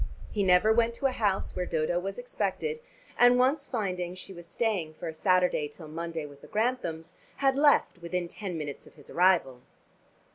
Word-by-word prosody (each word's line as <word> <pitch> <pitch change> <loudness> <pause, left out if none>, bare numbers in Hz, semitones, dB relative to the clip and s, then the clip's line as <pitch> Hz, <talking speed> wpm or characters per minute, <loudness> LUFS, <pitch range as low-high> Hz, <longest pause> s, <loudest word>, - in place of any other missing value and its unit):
He 210 - -1
never 190 +3 +5
went 235 0 +2
to 275 - -5
a 270 - +4
house 205 -6 0
where 180 -1 -2
Dodo 160 +2 0
was 195 +2 -5
expected, 245 - -2 0.4
and 245 0 +7
once 275 +3 +2
finding 180 -6 -2
she 185 +1 -9
was 175 -1 -11
staying 180 -7 -1
for 170 - -6
a 160 - -4
Saturday 180 -2 +2
till 155 +2 -12
Monday 165 0 -4
with 145 -1 -13
the - - -13
Granthams, 210 -8 -2 0.2
had 270 -1 +2
left 285 -9 +3
within 175 +1 -3
ten 185 -1 -6
minutes 145 -3 -6
of - - -18
his 145 - -14
arrival. 170 -9 +3
185 Hz, 185 wpm, -28 LUFS, 165-230 Hz, 0.4 s, and